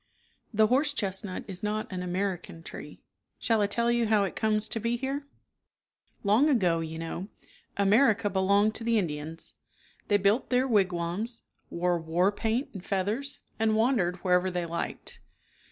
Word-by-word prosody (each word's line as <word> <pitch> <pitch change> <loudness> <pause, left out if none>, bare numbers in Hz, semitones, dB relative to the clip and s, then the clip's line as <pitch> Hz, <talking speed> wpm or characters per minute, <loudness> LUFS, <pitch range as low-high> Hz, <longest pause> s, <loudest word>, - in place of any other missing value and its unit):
The 215 -1 +4
horse 280 +6 +2
chestnut 195 -2 -3
is 185 -2 -7
not 210 0 -2
an 185 -1 -3
American 180 -2 -3
tree. - - -10 0.4
Shall 225 -2 +1
I 205 - +3
tell 235 +3 +1
you 235 -1 +2
how 210 -2 +4
it 195 - -3
comes 215 0 +1
to 225 - -1
be 230 +2 0
here? 275 +3 -3 1.0
Long 220 +9 +4
ago, 180 - +3
you 160 0 -5
know, 165 +3 -5 0.5
America 210 +2 +4
belonged 200 +2 +3
to 230 - -4
the 230 0 +2
Indians. 160 -3 -3 0.5
They 205 - +4
built 205 +5 +2
their 255 +1 +2
wigwams, 195 +1 0 0.3
wore 175 0 0
war 170 +4 +2
paint 225 +5 -1
and 195 -4 -8
feathers, 210 +10 -2 0.2
and 220 -1 +2
wandered 220 -6 +2
wherever 180 0 +3
they 180 -1 -2
liked. 170 0 -5
205 Hz, 155 wpm, -28 LUFS, 180-230 Hz, 1.0 s, The